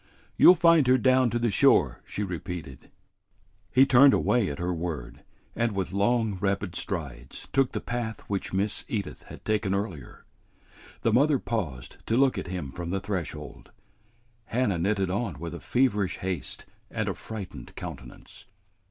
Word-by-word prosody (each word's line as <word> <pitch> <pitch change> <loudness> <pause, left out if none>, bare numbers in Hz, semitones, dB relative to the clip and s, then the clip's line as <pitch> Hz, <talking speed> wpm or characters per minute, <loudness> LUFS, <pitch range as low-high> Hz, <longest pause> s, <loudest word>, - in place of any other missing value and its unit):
"You'll 180 - +8
find 165 -5 +5
her 130 +1 +6
down 130 0 +4
to 120 - -1
the 120 -2 +1
shore," 95 - +3
she 105 - -3
repeated. 90 -6 -6 0.8
He 130 +6 +6
turned 135 +1 +7
away 120 -5 +2
at 70 - -5
her 90 +1 -1
word, 80 -6 -5 0.3
and 115 -1 0
with 95 -1 -3
long, 105 0 +1
rapid 100 -2 -1
strides 80 -9 -5
took 135 -1 +3
the - - -3
path 115 -3 -4
which 100 -2 -4
Miss 100 +2 -1
Edith 100 -5 -4
had - - -12
taken 105 -3 0
earlier. 95 - -5 0.8
The 115 - +1
mother 140 +4 +4
paused 90 - -4
to 115 - +2
look 135 0 +3
at - - -6
him 85 -7 -5
from 85 +3 -6
the 95 +2 -1
threshold. 85 -7 -5 0.8
Hannah 115 -7 0
knitted 95 +1 0
on 100 - -2
with 85 +3 -6
a 85 - -6
feverish 110 -7 +1
haste 90 -8 -4 0.2
and - - -3
a - - 0
frightened 95 - -8
countenance. - - -9
100 Hz, 160 wpm, -27 LUFS, 90-120 Hz, 0.8 s, You'll